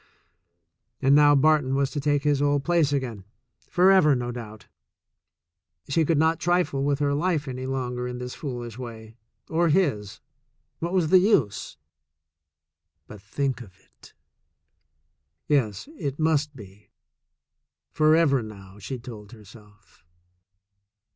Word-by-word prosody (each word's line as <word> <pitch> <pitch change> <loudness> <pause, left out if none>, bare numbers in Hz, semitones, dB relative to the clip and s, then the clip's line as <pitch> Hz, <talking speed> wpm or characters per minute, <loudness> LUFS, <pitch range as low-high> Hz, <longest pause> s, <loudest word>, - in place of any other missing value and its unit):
And 135 +1 +3
now 145 0 +6
Barton 145 -2 +3
was 140 -1 0
to 145 - -3
take 145 0 0
his 145 -2 +1
old 145 -1 +1
place 170 -4 +2
again 125 -8 -3 0.2
— 115 - -38
forever, 180 -5 +5
no 120 -1 -3
doubt. 110 -4 -9 1.2
She 160 +3 +2
could 165 0 +1
not 160 +2 +2
trifle 175 -6 0
with 140 0 +1
her 145 -1 0
life 155 0 0
longer 130 -2 -4
in 125 0 -6
this 125 0 -6
foolish 120 -4 -7
way, 110 -3 -9 0.3
or 165 +1 +1
his. 125 - 0 0.6
What 170 +1 -3
was 175 -5 +1
the 185 - +7
use? 165 - 0 1.3
But 105 +1 -12
think 130 +5 -3
of 95 -5 -14
it! - - -21 1.3
Yes, 125 - 0
it 140 -1 -3
must 150 -2 0
be 105 -3 -14 0.5
— - - -60 0.3
forever 155 -3 +3
now, 100 -2 -11
she 105 +7 -6
told 115 -3 -11
herself. 105 -3 -18
135 Hz, 130 wpm, -25 LUFS, 115-150 Hz, 1.3 s, the